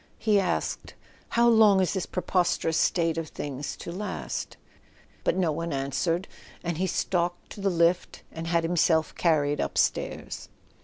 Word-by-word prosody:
He 210 -2 +3
asked: 190 - -2 0.3
"How 235 0 +3
long 220 -4 +6
is 185 -3 +1
this 190 -3 -2
preposterous 180 -3 0
state 165 -2 +2
of 165 - -4
things 145 -1 -5
to - - -7
last? 195 +2 -4 0.7
"—but - - +1
no 175 -4 +2
one 165 +2 -3
answered, 140 +6 -1 0.4
and 170 -2 -2
he 190 - +1
stalked 175 -1 -1
to 205 - -8
the 195 - +2
lift 170 0 +1
and 165 0 -6
had 170 0 +2
himself 165 -1 +2
carried 150 -4 +2
up - - -3
stairs. - - -1
170 Hz, 155 wpm, -27 LUFS, 160-190 Hz, 0.7 s, long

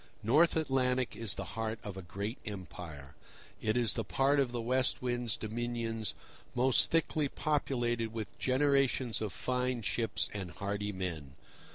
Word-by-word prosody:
North 150 +10 +5
Atlantic 130 -4 +1
is 115 -3 -2
the - - -3
heart 110 0 -2
of 100 -2 -5
a 95 - -5
great 100 - -4
empire. 85 - -7 0.5
It 110 +2 +1
is 120 -3 +3
the - - -1
part 140 +2 +3
of 135 -3 +2
the 120 - -2
West 130 +2 +2
Wind's 120 -2 -1
dominions 115 0 -2 0.4
most 125 +1 +4
thickly 155 -2 +2
populated 120 -7 0
with 110 -2 -6
generations 135 -3 +2
of 105 -3 -1
fine 125 -2 -1
ships 115 +2 +1
and 95 -3 -4
hardy 100 +4 -2
men. 85 -8 -4
120 Hz, 150 wpm, -33 LUFS, 105-130 Hz, 0.5 s, North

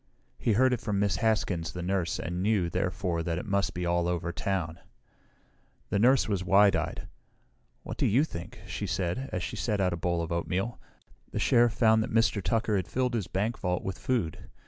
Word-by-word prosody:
He 115 - +2
heard 130 +4 +4
it 120 - -2
from 105 -4 -1
Miss 100 -3 +1
Haskins 90 -6 0
the 90 - -5
nurse 90 -2 -1
and 90 +1 -3
knew, 100 -4 +1
therefore, 90 -2 -1
that 80 0 -2
it 90 - -4
must 100 -1 0
be 90 0 -2
all 85 0 +1
over 85 -1 -1
town. 90 -2 -2 1.1
The 100 - +2
nurse 125 +4 +4
was 100 -4 -1
wide 100 +2 +5
eyed. - - -3 0.8
"What - - -6
do - - +2
you 125 +8 +4
think?" 105 - -7
she 100 - -4
said, 95 +9 -2
as - - -2
she - - -4
set 105 -3 -1
out 95 -2 +2
the 85 - -2
bowl 85 0 0
of 80 - -6
oatmeal. 90 +6 -2 0.5
"The - - -5
Sheriff 120 -1 +4
found 110 -2 +4
that 125 - -3
Mr. 115 -2 +2
Tucker 110 +1 +1
had 95 - -2
filled 125 -1 0
his 110 -6 -1
bank 105 +5 -1
vault 90 -1 -1
with 95 - -4
food. 115 -12 -2
95 Hz, 205 wpm, -29 LUFS, 90-110 Hz, 1.1 s, wide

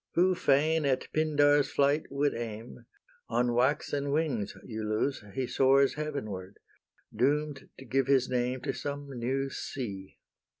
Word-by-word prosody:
Who 185 +2 +4
fain 160 0 +2
at 135 -2 0
Pindar's 145 -2 +3
flight 145 +2 +2
would 140 +1 0
aim, 115 +1 -7 0.4
On 120 0 +1
waxen 140 +3 +1
wings, 140 -9 -1
Iulus, 110 +4 -2
he 130 - 0
Soars 135 +2 +4
heavenward, 110 -11 -5 0.6
doom'd 145 +1 0
to 135 - -11
give 135 +3 +1
his 135 -2 +3
name 125 0 -1
To 135 - -2
some 145 0 -5
new 135 +2 -2
sea. 100 -8 -6
135 Hz, 130 wpm, -29 LUFS, 120-145 Hz, 0.6 s, Who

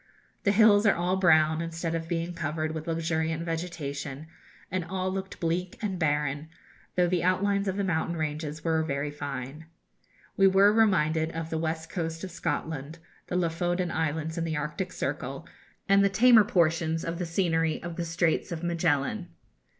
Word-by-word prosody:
The 200 - +5
hills 210 0 +6
are 200 - +5
all 180 +2 0
brown, 160 -4 +4
instead 165 0 -3
of 165 0 -3
being 170 0 -2
covered 155 -1 -2
with 160 +1 -6
luxuriant 160 0 -1
vegetation, 155 -4 -4 0.5
and 185 0 -1
all 185 +2 -2
looked 190 0 -5
bleak 175 +5 -2
and 200 -6 -3
barren, 150 -1 0 0.5
though 180 - +4
the 175 -1 0
outlines 200 +2 +1
of 190 0 -1
the 200 - 0
mountain 170 -2 -1
ranges 155 0 -3
were 160 -1 +2
very 145 -1 -2
fine. 145 +1 -6 0.7
We 195 - +5
were 195 +2 +5
reminded 160 -7 +3
of 165 0 -5
the 160 - -1
west 160 0 -3
coast 165 -1 -3
of 190 - -5
Scotland, 160 -2 -3 0.3
the - - -3
Lofoden 175 +1 0
Islands 160 +1 -2
in - - -1
the 160 -2 -2
Arctic 150 +5 -3
Circle, - - -4 0.4
and 195 0 +5
the 200 - +4
tamer 220 +2 +6
portions 165 -2 +1
of 165 +1 -3
the 180 - -1
scenery 165 -2 +1
of 170 -1 -5
the 175 - -2
Straits 165 0 0
of 170 0 -4
Magellan. 170 +2 0
165 Hz, 170 wpm, -28 LUFS, 160-180 Hz, 0.7 s, hills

